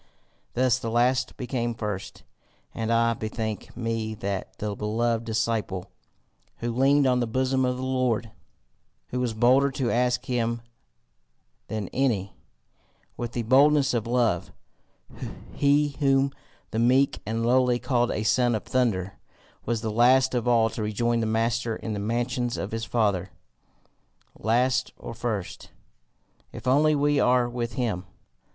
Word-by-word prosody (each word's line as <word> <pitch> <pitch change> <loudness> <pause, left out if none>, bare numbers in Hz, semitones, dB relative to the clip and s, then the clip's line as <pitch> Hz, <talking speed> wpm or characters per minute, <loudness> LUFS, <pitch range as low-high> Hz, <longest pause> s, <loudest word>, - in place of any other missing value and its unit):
Thus 125 0 +3
the 115 - -4
last 125 +2 +1
became 120 -2 -2
first. 105 -3 -5 0.5
And 115 0 -2
I 115 0 +3
bethink 110 -1 -5
me 115 -2 -2
that 100 -2 -4
the 105 -1 -3
beloved 115 +2 -1
disciple, 110 -4 -2 0.7
who 120 0 -3
leaned 135 +3 +4
on 125 -1 +3
the 120 - 0
bosom 130 +2 +1
of 125 0 -1
the 130 - -5
Lord, 130 -4 0 0.8
who 125 - -2
was 120 -3 -1
bolder 130 +5 +4
to 130 -3 -1
ask 125 +1 +1
him 115 -2 -1 1.0
than 110 -2 -3
any 115 -8 0 0.8
with 120 -1 -5
the 120 - -2
boldness 140 +3 +4
of 115 -2 -1
love, 120 -8 +1 1.0
he 145 +1 +3
whom 135 -1 +3 0.4
the 110 - -1
meek 130 +4 +3
and 115 +2 -2
lowly 125 0 +3
called 120 -1 +1
a 105 - -2
Son 120 +1 +2
of 110 - -3
Thunder, 100 -7 -1 0.5
was 115 -1 0
the 110 -1 -2
last 130 +4 +4
of 125 -1 -1
all 115 -2 +4
to - - -5
rejoin 115 +3 0
the 110 - 0
master 115 +1 0
in 110 - -5
the 105 - -3
mansions 120 +3 -1
of 100 - -4
his 115 0 -3
Father. 100 -5 0 1.1
Last 125 +3 +1
or - - -8
first 110 -5 -4 0.8
if - - -10
only 150 +4 +4
we 145 0 +2
are 125 -1 +3
with 120 -1 -4
him! 105 -8 -2
120 Hz, 145 wpm, -26 LUFS, 110-125 Hz, 1.1 s, leaned